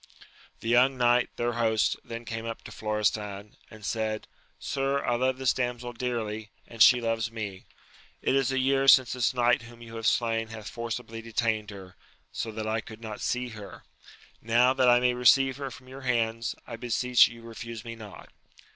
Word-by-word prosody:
The - - -6
young 125 +3 +4
knight, 120 0 +3
their 120 0 -1
host, 110 -2 +2
then 115 0 -7
came 115 0 -5
up 115 - -6
to - - -10
Florestan, 105 -1 -2
and 110 -2 -12
said, 110 -1 -2 0.3
Sir, 140 0 -1
I 120 - +1
love 130 +2 +1
this 130 -1 +2
damsel 125 -1 -3
dearly, 115 -3 -3 0.2
and 115 -2 -8
she 125 +2 +8
loves 115 -1 -1
me. 100 -4 -6 0.5
It - - 0
is 135 -1 +2
a 135 - -1
year 135 +1 +2
since 130 -2 +7
this 125 -2 +1
knight 120 -1 +2
whom 120 0 -13
you 115 0 -9
have 115 - -1
slain 115 -1 +1
hath 110 -1 -9
forcibly 115 -1 -5
detained 110 -2 -1
her, 95 -3 -11 0.4
so 115 - -4
that 110 0 -5
I 110 +1 -1
could 110 -1 -11
not 110 -2 -7
see 125 0 -1
her: 105 -4 -10 0.6
now, 120 +3 +4
that 130 -2 +4
I 120 0 +6
may 125 0 +2
receive 130 +2 +4
her 140 -1 -4
from 130 +1 -13
your 135 +1 -10
hands, 115 -3 0
I 115 - -7
beseech 125 +1 +4
you 115 0 -12
refuse 115 0 -8
me 115 0 -6
not. 105 -5 -12
115 Hz, 190 wpm, -28 LUFS, 110-125 Hz, 0.6 s, she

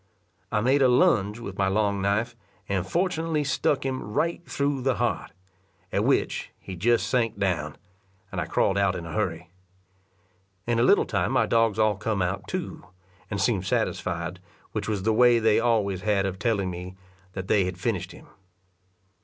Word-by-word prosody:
I 105 - +1
made 135 +5 +3
a 130 - +6
lounge 125 - +3
with 100 -5 -8
my 95 - +3
long 100 0 +1
knife, 110 +4 0 0.3
and 95 -2 -1
fortunately 165 -3 0
stuck 140 0 0
him 130 -1 -2
right 165 +12 -1
through 140 -1 -1
the 130 -1 +1
heart; - - -1 0.6
at - - +1
which - - 0
he 95 - -8
just 115 +6 +2
sank 115 -5 0
down, 85 -6 -1 0.6
and - - -2
I - - -4
crawled 100 +1 +1
out 100 -2 +2
in 85 -2 -5
a 85 - -7
hurry. 90 -5 -2 1.1
In 120 -1 +1
a - - +4
little 200 - +5
time - - -1
my 125 -4 +3
dogs 115 -2 +2
all 110 -2 +2
come 105 -2 -1
out 90 - -3
too, - - -5 0.5
and 100 - -3
seemed 95 -5 +1
satisfied, 85 +2 -2 0.3
which 110 0 -3
was 100 -3 -1
the 110 +1 +2
way 120 +1 +5
they 110 -1 +3
always 105 -5 +1
had 100 -2 +1
of 95 -1 -3
telling 100 -6 0
me 90 +1 -7 0.4
that 95 -1 -5
they 100 -2 +3
had 90 -1 -4
finished - - -2
him. - - -14
105 Hz, 180 wpm, -26 LUFS, 95-120 Hz, 1.1 s, a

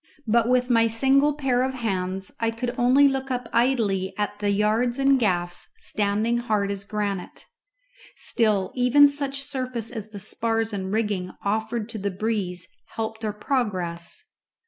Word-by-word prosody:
But 230 +1 +3
with 250 0 +3
my 230 -1 +5
single 270 +6 +3
pair 265 -4 +1
of 260 0 -1
hands 190 -5 -2
I 230 - +1
could 240 +2 -3
only 255 +4 +5
look 270 0 -1
up 250 -2 -2
idly 210 -7 +1
at 205 0 -2
the 205 -1 0
yards 215 +5 +1
and 275 0 +4
gaffs 175 -5 -1
standing 215 +3 0
hard 210 -4 0
as 200 0 -5
granite. 200 -3 -4 0.7
Still, 215 -5 +1
even 255 +3 +6
such 280 -1 -1
surface 255 -5 -4
as 220 -3 -6
the 210 - -9
spars 225 +2 -1
and 190 -1 -3
rigging 205 -4 -1
offered 220 +2 -1
to 225 -2 -5
the 200 +1 -1
breeze 190 -3 -2 0.3
helped 220 0 -4
our 215 - 0
progress. 205 -7 -2
225 Hz, 155 wpm, -25 LUFS, 200-250 Hz, 0.7 s, even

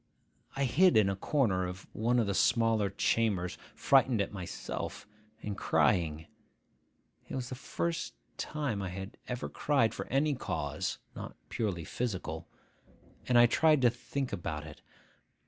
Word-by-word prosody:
I 140 - 0
hid 170 +7 +5
in 105 -3 +5
a - - -2
corner 95 -5 +1
of 90 +1 -7
one 120 +3 +1
of 115 - +3
the 100 - 0
smaller 115 -1 +3
chambers, 100 -2 0 0.2
frightened 130 -4 +4
at 100 - -1
myself, 90 -3 -5 0.4
and 105 -1 -3
crying 80 -7 +2 1.0
(it - - -4
was 125 -2 -3
the - - -5
first 165 +6 -3 0.2
time 140 -9 -2
I 95 - -3
had 95 +2 -7
ever 125 0 -3
cried 120 -7 +1
for - - -5
any 145 +3 +2
cause 130 - -3 0.2
not - - -7
purely 95 -7 -2
physical), 90 -6 -3 0.8
and 125 - +4
I 120 - +9
tried 150 +3 +4
to 120 - +6
think 130 +1 -4
about 80 -5 -3
it. 75 -1 -11
115 Hz, 145 wpm, -31 LUFS, 95-130 Hz, 1.0 s, I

